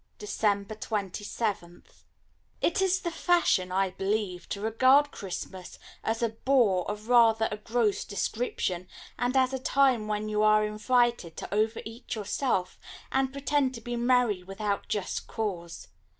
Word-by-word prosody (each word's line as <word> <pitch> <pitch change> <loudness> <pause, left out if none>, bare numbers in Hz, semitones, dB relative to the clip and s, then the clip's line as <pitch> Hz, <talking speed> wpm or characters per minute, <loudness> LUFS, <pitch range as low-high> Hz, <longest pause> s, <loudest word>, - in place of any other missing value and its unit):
December 205 0 -1
27th 205 -3 -4 0.5
It 345 - +1
is 380 0 +2
the 340 - -2
fashion, 325 - +2
I 190 0 +1
believe, 195 -2 -2
to 200 - -3
regard 260 +7 +4
Christmas 185 -1 -7 0.3
as 225 +1 -1
a 230 - +2
bore 220 -6 +2
of 210 +1 -5
rather 225 -2 +5
a 210 - -3
gross 220 -1 0
description, 200 -4 -2 0.3
and 250 +2 +1
as 260 0 +3
a 265 - -2
time 260 -4 +2
when 210 0 -2
you 210 0 0
are 215 0 +5
invited 235 -4 +1
to - - -6
over 220 +2 +1
eat 225 +3 -6
yourself, 205 -3 -1 0.3
and 265 0 +1
pretend 280 -1 0
to 230 - -8
be 240 +1 -4
merry 240 -5 +2
without 200 +2 -3
just 205 -3 -3
cause. 175 - -5
215 Hz, 145 wpm, -28 LUFS, 200-250 Hz, 0.5 s, rather